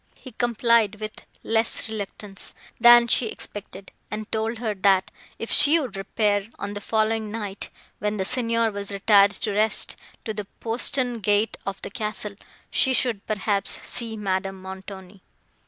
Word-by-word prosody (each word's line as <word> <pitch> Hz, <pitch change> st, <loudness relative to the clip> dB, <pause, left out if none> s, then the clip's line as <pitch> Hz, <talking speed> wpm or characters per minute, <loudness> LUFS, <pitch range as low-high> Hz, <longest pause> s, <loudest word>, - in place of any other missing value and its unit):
He 260 Hz, -, -12 dB
complied 235 Hz, -2 st, +2 dB
with 215 Hz, 0 st, -7 dB, 0.2 s
less 225 Hz, 0 st, +1 dB
reluctance, 205 Hz, -2 st, -7 dB, 0.2 s
than 240 Hz, 0 st, +8 dB
she 235 Hz, 0 st, +1 dB
expected, 200 Hz, -2 st, -8 dB, 0.2 s
and 215 Hz, 0 st, -4 dB
told 220 Hz, +1 st, 0 dB
her, 220 Hz, -2 st, -2 dB
that, 195 Hz, -1 st, +3 dB, 0.3 s
if 230 Hz, -, -5 dB
she 310 Hz, +3 st, +6 dB
would 260 Hz, -8 st, -4 dB
repair, 205 Hz, +1 st, 0 dB
on 200 Hz, 0 st, -4 dB
the 205 Hz, -, -5 dB
following 220 Hz, 0 st, 0 dB
night, 205 Hz, -3 st, -5 dB, 0.3 s
when 210 Hz, +1 st, -1 dB
the 190 Hz, -, -1 dB
Signor 230 Hz, -1 st, +1 dB
was 200 Hz, 0 st, -5 dB
retired 200 Hz, 0 st, +5 dB
to 215 Hz, +1 st, -3 dB
rest, 215 Hz, +2 st, +2 dB, 0.2 s
to 220 Hz, -, -2 dB
the 210 Hz, -1 st, -5 dB
postern 245 Hz, +1 st, +1 dB
gate 205 Hz, +1 st, +2 dB
of 195 Hz, -, -3 dB
the -, -, -5 dB
castle, 210 Hz, -4 st, -3 dB, 0.4 s
she 265 Hz, -, +3 dB
should, 235 Hz, -7 st, 0 dB
perhaps, 205 Hz, -1 st, 0 dB
see 230 Hz, -2 st, -4 dB
Madame 195 Hz, -1 st, -2 dB
Montoni. 190 Hz, 0 st, -9 dB
215 Hz, 155 wpm, -24 LUFS, 200-230 Hz, 0.4 s, than